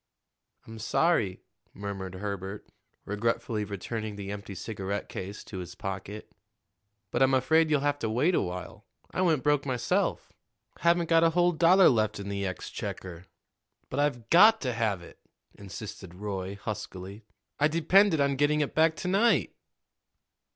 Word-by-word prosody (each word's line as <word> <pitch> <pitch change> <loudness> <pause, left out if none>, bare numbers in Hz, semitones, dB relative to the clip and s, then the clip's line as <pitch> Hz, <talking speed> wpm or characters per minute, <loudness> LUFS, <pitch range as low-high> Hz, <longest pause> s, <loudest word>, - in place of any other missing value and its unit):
"I'm 115 0 -10
sorry," 110 - +1 0.3
murmured 95 -2 -6
Herbert, 100 0 -5 0.4
regretfully 110 +1 -1
returning 105 +2 -5
the 100 -1 -6
empty 100 -1 -7
cigarette 100 +1 -4
case 100 +3 -6
to 95 - -7
his 90 0 -8
pocket; 100 +2 -6 0.8
"but - - -1
I'm 135 0 +5
afraid 160 +5 +3
you'll 150 -2 +2
have 145 0 0
to 110 - -2
wait 130 +11 +2
a - - +3
while. 90 0 -6 0.2
I - - -2
went 160 -7 +2
broke 145 -1 +2
myself 125 -5 -1 0.5
haven't 170 +1 +3
got 165 0 +4
a 165 - +5
whole 175 +1 +3
dollar 175 +3 +6
left 110 -4 +2
in 100 0 -6
the 100 -1 -2
exchequer." 90 0 -6 0.6
"But 130 - -2
I've 120 -6 -1
got 215 +6 +7
to 125 -3 -1
have 110 -6 -1
it," - - -14 0.3
insisted 95 -2 -9
Roy 95 -1 -4
huskily. 100 -1 -7 0.4
"I 150 - +5
depended 170 +3 +4
on 140 -1 +2
getting 150 +2 +2
it 145 - -2
back 160 0 +3
to 180 - -5
night." 205 +6 +3
110 Hz, 150 wpm, -28 LUFS, 100-155 Hz, 0.8 s, got